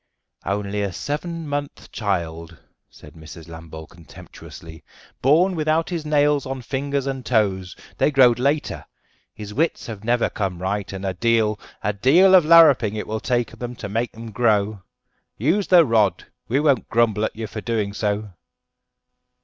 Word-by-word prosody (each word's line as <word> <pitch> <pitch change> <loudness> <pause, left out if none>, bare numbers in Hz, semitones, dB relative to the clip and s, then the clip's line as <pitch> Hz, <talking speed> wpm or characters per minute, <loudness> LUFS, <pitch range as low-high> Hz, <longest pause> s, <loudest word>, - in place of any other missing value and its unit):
"Only 100 +1 -2
a 100 -1 -2
seven 160 - -5
month 145 0 -5
child," 85 -5 -3 0.3
said 75 -1 -16
Mrs. 80 +1 -12
Lambole 80 -1 -10
contemptuously, 80 -1 -13 0.4
"born 170 +8 +3
without 160 +2 0
his 165 -3 -4
nails 145 -1 +2
on 130 -1 -5
fingers 140 +2 -2
and 135 -1 -4
toes; 95 -7 0 0.2
they - - +3
growed 125 -4 +4
later. 140 +4 -1 0.5
His 105 -1 -8
wits 160 +9 -1
have 110 -3 -8
never 120 +1 +1
come 95 -4 -4
right, 100 +2 -3
and 95 0 -6
a 95 - -1
deal, 110 0 +1 0.2
a 105 - 0
deal 160 - +4
of 180 -4 +7
larruping 150 -10 +6
it 105 - -4
will 110 +1 -4
take 120 -1 -1
to 120 -4 -6
make 115 +2 -3
'em 115 -1 -8
grow. 105 -2 +1 0.6
Use 170 - +1
the 175 -3 +6
rod; 105 -7 +1 0.2
we 130 +5 +1
won't 145 -5 +1
grumble 110 -2 +1
at 110 - -2
you 110 0 -5
for 110 +1 -7
doing 105 -3 -2
so." 105 -1 -3
115 Hz, 155 wpm, -22 LUFS, 100-140 Hz, 0.6 s, of